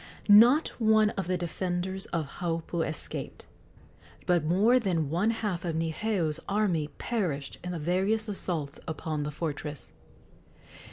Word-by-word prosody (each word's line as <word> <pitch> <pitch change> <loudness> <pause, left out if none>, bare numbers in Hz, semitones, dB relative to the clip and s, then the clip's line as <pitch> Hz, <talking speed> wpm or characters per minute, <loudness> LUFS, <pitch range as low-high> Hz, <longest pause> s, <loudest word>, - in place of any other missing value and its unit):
Not 235 +9 +7
one 220 -1 +4
of 190 -3 -4
the 185 0 +1
defenders 180 +2 -3
of 165 -3 -2
Haupu 165 -1 -2
escaped, 155 -1 -4 0.8
but 175 -3 +2
more 205 +10 +4
than 170 - -1
one 180 +7 +2
half 210 -6 -2
of 170 -3 -2
Niheu's 165 0 -1
army 195 -7 +1
perished 170 - -2
in 180 - -4
the 175 - -3
various 190 +7 0
assaults 170 -8 -3
upon 155 -1 -3
the 145 - -2
fortress. 150 -1 -5
175 Hz, 130 wpm, -28 LUFS, 160-210 Hz, 0.8 s, Not